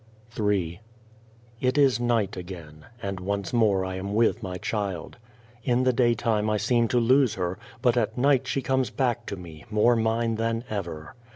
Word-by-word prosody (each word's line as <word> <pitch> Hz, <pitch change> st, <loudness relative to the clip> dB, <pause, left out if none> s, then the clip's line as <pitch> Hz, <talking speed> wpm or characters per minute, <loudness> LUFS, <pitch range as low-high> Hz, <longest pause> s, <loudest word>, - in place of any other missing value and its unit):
Ill 105 Hz, -3 st, 0 dB
IT 115 Hz, -, -4 dB
is 135 Hz, -5 st, +4 dB
night 120 Hz, -5 st, +1 dB
again, 85 Hz, -4 st, -9 dB, 0.2 s
and 100 Hz, -1 st, -3 dB
once 100 Hz, +3 st, -3 dB
more 105 Hz, -5 st, +3 dB
I 95 Hz, 0 st, -4 dB
am 100 Hz, +2 st, -4 dB
with 115 Hz, +1 st, +2 dB
my 90 Hz, -3 st, -4 dB
child. 100 Hz, -3 st, -3 dB, 0.5 s
In 125 Hz, +1 st, +2 dB
the 130 Hz, 0 st, +3 dB
daytime 115 Hz, -3 st, +2 dB
I 105 Hz, -, +1 dB
seem 115 Hz, +2 st, +2 dB
to 125 Hz, -, +2 dB
lose 130 Hz, +1 st, +4 dB
her, 90 Hz, +1 st, -3 dB, 0.2 s
but 120 Hz, -2 st, +4 dB
at 110 Hz, -1 st, 0 dB
night 135 Hz, 0 st, +3 dB
she 135 Hz, -, -1 dB
comes 130 Hz, -2 st, +1 dB
back 120 Hz, -2 st, -1 dB
to 100 Hz, -, -3 dB
me, 85 Hz, -4 st, -11 dB
more 110 Hz, +3 st, +4 dB
mine 115 Hz, 0 st, 0 dB
than 115 Hz, +1 st, -1 dB
ever. 85 Hz, -7 st, -5 dB
110 Hz, 175 wpm, -26 LUFS, 95-120 Hz, 0.5 s, is